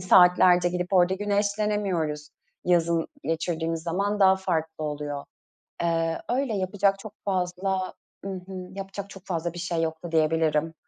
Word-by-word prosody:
saatlerce 180 0 +6
gidip 180 +2 -3
orada 185 0 +5
güneşlenemiyoruz. 200 -6 0 0.4
Yazın 170 -2 +2 0.2
geçirdiğimiz 165 0 -1
zaman 200 +5 -1
daha 190 0 +6
farklı 160 -4 -2
oluyor. 145 -1 -4 0.6
Eee, 165 -1 0
öyle, 255 -2 0
yapacak 195 +1 +1
çok 205 0 -9
fazla 185 0 -1 0.3
I - - -4
hı. 185 -1 -6
Yapacak 195 +1 -6
çok 195 -1 -12
fazla 170 -2 -2
bir 175 - -8
şey 170 -1 -1
yoktu 160 +1 -3
diyebilirim. 160 0 +2
180 Hz, 130 wpm, -26 LUFS, 165-195 Hz, 0.6 s, saatlerce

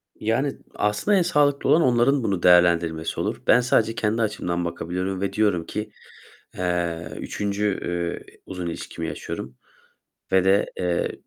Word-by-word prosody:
Yani 130 +6 -1 0.2
aslında 105 - +1
en - - +4
sağlıklı 145 -5 +2
olan 165 - +5
onların 125 0 +3
bunu 95 -5 -1
değerlendirmesi 85 -2 +3
olur. - - -2
Ben 120 - +6
sadece 115 -2 +2
kendi 110 +1 0
açımdan 90 -5 -1
bakabiliyorum 90 +3 -3
ve 100 - -2
diyorum 100 -6 +1
ki, 105 0 -5 0.7
eee, 85 -2 -2
3. 100 -1 -2
eee, 85 -1 -4
uzun 90 -2 -5
ilişkimi 85 - -5
yaşıyorum 65 0 -6 0.8
ve 95 -1 +4
de, 95 +2 +3
eee, 90 -1 0
95 Hz, 140 wpm, -24 LUFS, 85-115 Hz, 0.8 s, Ben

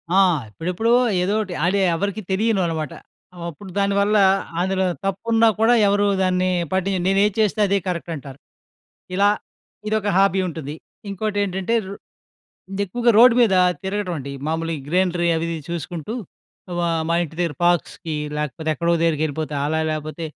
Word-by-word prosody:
ఆ! - - +5 0.3
ఇప్పుడెప్పుడో 180 - -1 0.3
ఏదోటి 200 0 -1
అది 195 +3 +2 0.2
ఎవరికీ 200 +4 -2
తెలియనివి 210 0 +1
అన్నమాట. 160 -3 -3 0.6
అప్పుడు 185 +5 -11
దానివల్ల 200 +1 +2 0.4
అందులో 190 +1 +1 0.2
తప్పున్నా 225 +4 +2
కూడా 225 +2 +5
ఎవరు 205 +1 +2 0.2
దాన్ని 185 0 +1 0.2
పట్టిం 190 +1 0
నేను 195 +1 +3
ఏది 210 - 0
చేస్తే 215 0 +1
అదే 200 +1 +2
కరెక్ట్ 170 -1 -3
అంటారు. 140 -2 -10 0.8
ఇలా 200 +2 +4 0.6
ఇదొక 215 -1 0
హాబీ 195 -1 +3
ఉంటుంది. 155 -3 -6 0.3
ఇంకోటి 205 +1 -3
ఏంటంటే 190 +3 -1
రొ 195 - -6 0.9
ఎక్కువగా 240 +5 +1
రోడ్డు 240 0 +8
మీద 220 -5 +4 0.3
తిరగటం 190 -2 -2
అండి. 140 +1 -7
మామూలుగా 160 -1 -2
గ్రీనరి 175 0 +1
అవి 165 +1 -2
ఇవి 165 - -3
చూసుకుంటూ 170 +4 -5 0.6
ఆహ్, 170 -2 0
మా 170 - +2
ఇంటి 160 0 -11
దగ్గర 170 -4 -1
పార్క్స్‌కి 170 -2 0 0.2
లేకపోతే 150 +1 -4
ఎక్కడో 170 +2 0
దగ్గరికి 165 -2 +1
వెళ్ళిపోతా. 155 0 -3
అలా 160 +1 0
లేపోతే, 155 +2 -4
185 Hz, 145 wpm, -21 LUFS, 165-200 Hz, 0.9 s, రోడ్డు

